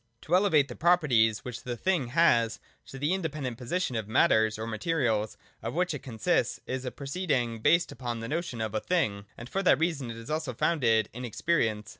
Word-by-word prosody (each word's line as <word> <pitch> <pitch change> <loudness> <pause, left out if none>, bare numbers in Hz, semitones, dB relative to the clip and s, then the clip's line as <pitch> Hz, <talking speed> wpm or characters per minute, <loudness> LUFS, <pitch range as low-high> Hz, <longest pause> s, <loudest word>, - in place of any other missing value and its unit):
To 165 - -5
elevate 180 -7 +4
the - - -8
properties, 135 -11 +3
which 125 -1 -6
the 120 -1 -5
Thing 175 -4 0
has, 120 -5 +3 0.3
to 135 - -9
the 145 +6 0
in 190 - -1
dependent 145 -7 -4
position 130 +2 -2
of 110 -2 -3
matters, 110 0 +3
or 110 - -4
materials 115 -2 -1 0.2
of - - -4
which 180 -1 +1
it 145 - -4
con 120 -4 -9
sists, - - +1
is 130 0 -4
a 125 - -3
proceeding 135 -6 -2
based 170 +9 +3
upon 120 -3 -4
the 115 - -5
notion 155 -6 -3
of 110 -1 -3
a 110 - 0
Thing: 105 - -1
and 120 - -8
for 195 - -2
that 180 - +5
reason 155 -5 -1
is 115 +3 -7
also 155 -5 -2
found 165 +3 0
in 110 -2 +4
experience. 115 -3 -1
125 Hz, 205 wpm, -28 LUFS, 115-165 Hz, 0.3 s, that